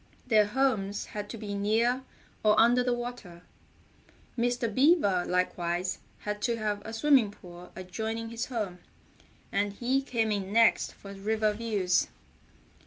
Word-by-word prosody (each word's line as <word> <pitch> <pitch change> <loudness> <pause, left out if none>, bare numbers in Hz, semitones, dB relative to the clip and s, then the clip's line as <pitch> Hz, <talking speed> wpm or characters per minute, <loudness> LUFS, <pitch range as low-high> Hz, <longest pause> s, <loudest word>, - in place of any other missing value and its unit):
Their 215 -4 +4
homes 210 -5 0
had 205 -1 -6
to 230 - -6
be 205 -1 -5
near 225 +5 +1 0.4
or 210 0 +5
under 240 +2 +5
the 250 - +1
water. 240 -8 -5 0.9
Mr. 245 0 0
Beaver 255 - +4
likewise 180 0 -1 0.2
had 210 0 -4
to 235 +1 0
have 210 -2 -2
a 220 - -7
swimming 255 -1 +4
pool 180 -3 -13
adjoining 220 +5 -4
his 230 +1 -4
home, 210 -8 -3 0.7
and 200 0 0
he 255 +5 0
came 230 -5 -1
in 200 -2 -2
next 230 +1 +4
for 200 0 -10
river 215 +2 0
views. 205 -5 +1
215 Hz, 140 wpm, -29 LUFS, 200-235 Hz, 0.9 s, or